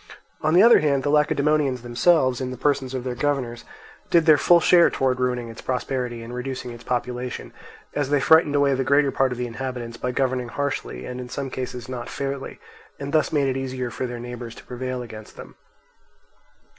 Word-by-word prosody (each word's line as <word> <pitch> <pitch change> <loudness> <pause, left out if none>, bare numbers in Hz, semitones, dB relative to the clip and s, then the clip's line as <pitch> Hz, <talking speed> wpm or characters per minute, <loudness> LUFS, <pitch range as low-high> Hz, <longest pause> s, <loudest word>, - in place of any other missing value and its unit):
On 155 +2 +2
the 185 - +7
other 235 +1 +8
hand 140 -3 +1
the 145 - +1
Lacedaemonians 150 -3 +2
themselves, 130 +1 +2
in 130 - -2
the 130 - -6
persons 135 -1 0
of 130 - -3
their 125 -1 -3
governors, 125 -3 -2 0.4
did 170 -2 +4
their 155 -2 +7
full 175 -1 +6
share 170 +1 +6
towards 130 -1 0
ruining 125 -2 -1
its 115 - -10
prosperity 125 -2 -3
and 115 +1 -8
reducing 125 0 -5
its 120 0 -11
population, 125 0 -3 0.4
as 145 -2 -1
they 145 0 +3
frightened 155 +1 +5
away 140 -1 +3
the 135 0 0
greater 140 +1 +3
part 135 -1 +1
of 125 - -4
the 125 - -2
inhabitants 120 -1 -5
by 125 - -3
governing 125 -1 0
harshly 135 - -3
and 125 0 -6
in 125 - -8
some 135 0 -4
cases 125 -2 -5
not 125 -2 -6
fairly, 140 -1 -5 0.4
and 140 0 -5
thus 155 -3 +2
made 145 -3 +2
it 135 0 -1
easier 130 -2 -4
for 130 - -3
their 120 -1 -6
neighbours 120 -1 -7
to - - -13
prevail 125 0 -4
against 110 -2 -11
them. - - -10
130 Hz, 200 wpm, -23 LUFS, 125-140 Hz, 0.4 s, other